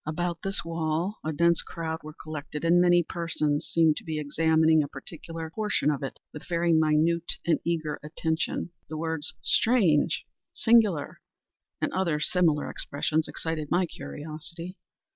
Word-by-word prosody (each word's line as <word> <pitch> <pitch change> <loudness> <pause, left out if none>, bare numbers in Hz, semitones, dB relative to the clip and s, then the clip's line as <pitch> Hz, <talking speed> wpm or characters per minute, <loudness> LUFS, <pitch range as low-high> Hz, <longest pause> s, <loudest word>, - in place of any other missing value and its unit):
About 170 +2 -2
this 195 -2 -1
wall 165 +4 -1
a 155 - -1
dense 170 +2 +3
crowd 165 -2 -5
were 155 0 -10
collected, 155 0 -5
and 175 +1 +5
many 175 -1 +5
persons 155 -3 -1
seemed 160 -2 +3
to - - -6
be 160 -1 -3
examining 160 +1 +3
a 145 - -2
particular 160 +3 -8
portion 210 -8 +1
of 140 - -3
it 135 - -5 0.2
with 150 - -9
very 170 -1 +2
minute 160 +2 +3
and 170 - +3
eager 160 -3 -1
attention. 160 +3 -2 0.2
The 155 - -4
words 160 -1 -3
"strange!" 195 -11 +3 0.3
"singular!" 215 -10 +3 0.6
and - - -1
other 170 -5 +1
similar 160 -2 +2
expressions, 155 +2 -1
excited 160 -2 -4
my 180 +1 +3
curiosity. 165 +3 -8
160 Hz, 145 wpm, -27 LUFS, 155-170 Hz, 0.6 s, and